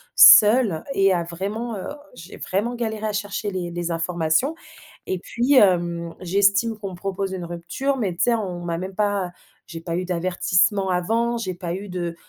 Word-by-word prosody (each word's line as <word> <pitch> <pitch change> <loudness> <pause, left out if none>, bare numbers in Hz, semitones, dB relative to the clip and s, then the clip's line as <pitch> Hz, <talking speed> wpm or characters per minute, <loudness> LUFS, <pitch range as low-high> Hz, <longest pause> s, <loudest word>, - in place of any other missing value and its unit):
seule 210 -6 +7
et 195 -1 +3
a 175 -1 0
vraiment, 200 +7 -5
heu, 190 - -6 0.3
j'ai 175 -2 -11
vraiment 215 +6 -2
galéré 220 -2 -3
à 210 - -3
chercher 205 0 -3
les 180 -2 -4
les 175 0 -3
informations 165 - 0 0.6
et 185 - 0
puis, 240 +9 0
hem, 170 -6 +2
j'estime 200 +4 +2
qu'on 200 -2 -6
me - - -8
propose 195 +1 -4
une 180 -2 -5
rupture 175 +11 -3
mais 205 -8 -1
tu 195 - +1
sais, 240 - +3
on 185 -6 -4
m'a 170 -1 -2
même 185 +2 -6
pas 200 -3 0 0.4
j'ai 165 -1 -8
pas 165 0 -4
eu 185 - -2
d'avertissement 185 +2 +1
avant 225 +7 0
j'ai 190 -5 -3
pas 175 -1 -5
eu 200 +2 -7
de 175 -2 -4
190 Hz, 185 wpm, -22 LUFS, 175-210 Hz, 0.6 s, seule